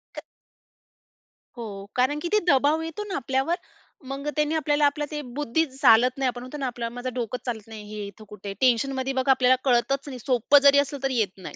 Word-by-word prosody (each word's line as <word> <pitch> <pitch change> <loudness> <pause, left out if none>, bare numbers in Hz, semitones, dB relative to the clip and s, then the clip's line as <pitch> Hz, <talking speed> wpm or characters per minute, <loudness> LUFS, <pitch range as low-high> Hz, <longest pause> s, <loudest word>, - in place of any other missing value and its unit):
क, - - -7 1.4
हो, 235 - -5 0.3
कारण 260 +4 +1
की 345 - -3
ते 425 - +5
दबाव 290 +2 +3
येतो 325 +5 -5
ना 395 - -4
आपल्यावर. 270 +5 0 0.5
मग, 275 +2 -5
त्यांनी 300 +1 +1
आपल्याला 300 -2 +2
आपला 295 +1 0
ते 300 -1 -3
बुद्धी 295 +2 0
चालत 255 -2 +4
नाही 270 -1 0
आपण 245 -1 -3
म्हणतो 255 +4 -8
ना, 275 - -3
"आपला 235 -1 -4
माझं 245 +1 -6
डोकं 245 0 -3
चालत 225 -4 -5
नाही, 220 -1 -9
हे 210 -1 -5
इथं 200 +2 -13
कुठे." 200 -1 -7
टेन्शनमध्ये 260 +1 +1
बघा, 260 +1 +2
आपल्याला 255 -1 +4
कळतच 265 +2 +1
नाही, 260 -3 -7
सोपं 250 +3 +3
जरी 280 0 +7
असलं 285 0 -2
तरी, 270 -2 0
येत 210 -4 +1
नाही. 185 - -9
265 Hz, 205 wpm, -25 LUFS, 240-290 Hz, 1.4 s, जरी